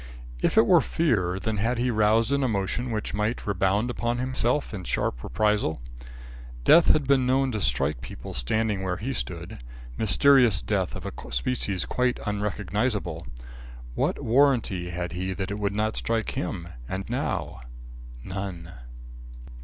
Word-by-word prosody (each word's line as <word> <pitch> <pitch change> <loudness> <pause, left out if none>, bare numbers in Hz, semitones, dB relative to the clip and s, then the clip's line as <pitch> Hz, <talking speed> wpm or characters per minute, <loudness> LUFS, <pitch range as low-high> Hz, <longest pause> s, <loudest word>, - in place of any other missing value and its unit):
If - - +1
it - - +7
were - - +6
fear, 100 - 0
then 110 +1 -2
had 115 +5 0
he 125 +1 +1
roused 110 +2 +3
an 140 0 +2
emotion 115 +1 -1
which 110 -2 -3
might 105 +3 -1
rebound 100 +4 +1
upon 120 0 -1
himself 130 +1 -1
in 95 -3 -5
sharp - - -2
reprisal. 105 - 0 0.8
Death 165 - +7
had 150 - +4
been 130 -2 +3
known 135 +1 +2
to 110 -3 -3
strike 65 -1 +1
people 60 - -8
standing 105 - 0
where 95 -1 -2
he 130 +5 -3
stood; 85 - -5 0.4
mysterious 120 -1 +5
death 95 -4 -1
of - - -8
a - - -5 0.2
species 95 - -1
quite 125 -1 0
unrecognisable. 105 -3 -2 0.7
What - - -1
warranty 115 -8 +2
had 90 0 -4
he 95 +2 -3
that 95 +2 -4
it 105 - -3
would 100 -1 -1
not 110 +1 0
strike 115 -1 -1
him, 95 -10 -4 0.2
and 95 +1 -4
now? - - -3 0.6
None. 90 -2 -6
105 Hz, 150 wpm, -26 LUFS, 95-120 Hz, 0.8 s, it